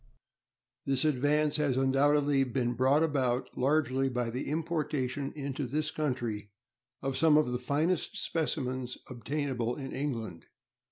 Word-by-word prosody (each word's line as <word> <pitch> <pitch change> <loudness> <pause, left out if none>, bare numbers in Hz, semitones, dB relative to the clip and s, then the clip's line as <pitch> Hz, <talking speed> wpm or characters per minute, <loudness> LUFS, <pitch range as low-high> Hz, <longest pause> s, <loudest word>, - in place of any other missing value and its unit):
This 135 +1 +1
advance 150 +1 +2
has 145 -4 +1
undoubtedly 140 +1 +3
been 125 -1 -1
brought 130 +5 +3
about 130 -5 0
largely 135 -1 +2
by 125 -2 -1
the 125 +3 -4
importation 150 -4 -1
into 140 -2 -3
this 150 +4 -1
country 120 -8 -2 0.5
of 135 -1 -1
some 155 0 +5
of 150 -5 +2
the 125 - -1
finest 150 +7 0
specimens 130 -6 -2
obtainable 125 -1 -2
in 135 -2 -6
England. 115 - -4
135 Hz, 125 wpm, -30 LUFS, 125-150 Hz, 0.5 s, some